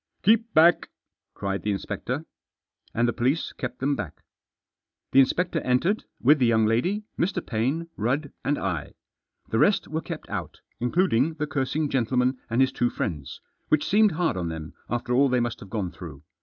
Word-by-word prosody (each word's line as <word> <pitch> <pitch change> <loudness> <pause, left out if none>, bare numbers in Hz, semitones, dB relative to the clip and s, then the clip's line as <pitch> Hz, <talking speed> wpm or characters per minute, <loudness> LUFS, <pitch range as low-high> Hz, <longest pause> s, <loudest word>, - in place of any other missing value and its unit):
" - - -50
Keep 225 +2 +4
back 170 +3 +6
f - - -33 0.2
" - - -62
cried 100 0 -2
the 105 - -2
inspector. 115 +9 -3 0.7
And 120 +1 +1
the 120 - 0
police 135 +7 0
kept 125 - -5
them 140 +2 0
back. 100 - -7 0.9
The 135 - +6
inspector 165 +5 +2
entered, 165 +12 +1
with 145 +4 +5
the 125 - +4
young 110 -1 +4
lady, 175 - +1 0.2
Mr. 180 0 0
Paine, 135 +9 -1
Rudd 135 +7 -1
and 145 - +1
I. 85 -7 -3 0.5
The 110 - +1
rest 200 - +3
were 160 +1 -2
kept - - -7
out, - - -5 0.2
including 150 +2 +2
the 150 -1 -2
cursing 150 +1 -1
gentleman 125 0 +1
and 115 +3 +2
his 130 - +4
two 120 - +1
friends, 75 - -4 0.3
which 155 0 +2
seemed 210 0 +4
hard 165 - 0
on 85 -2 -2
them 80 -1 -6 0.2
after 120 0 -1
all 135 +2 +4
they 125 0 +2
must 120 -1 -2
have 100 - -11
gone 100 -5 -2
through. 75 -7 -10
130 Hz, 185 wpm, -26 LUFS, 110-155 Hz, 0.9 s, back